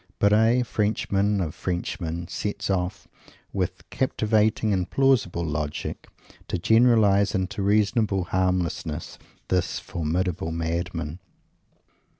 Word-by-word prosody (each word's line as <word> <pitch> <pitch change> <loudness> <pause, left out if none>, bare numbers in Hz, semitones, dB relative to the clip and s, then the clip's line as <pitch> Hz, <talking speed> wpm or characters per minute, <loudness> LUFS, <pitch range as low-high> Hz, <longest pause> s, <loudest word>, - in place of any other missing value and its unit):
Barres 110 +4 +4
Frenchman 105 -1 +1
of 80 -4 -2
Frenchmen 85 -1 -3
sets 100 +2 -3
off, 90 -1 -2 0.5
with - - -3
captivating 110 -3 +1
and 90 -2 -1
plausible 120 -11 +2
logic, 75 -1 -4 0.4
to - - -1
generalize 105 0 +4
into 95 +1 -2
reasonable 105 -1 +2
harmlessness 90 -4 -1 0.3
this 90 -1 0
formidable 85 +1 -2
madman. 85 0 -3
95 Hz, 95 wpm, -25 LUFS, 85-105 Hz, 0.5 s, Barres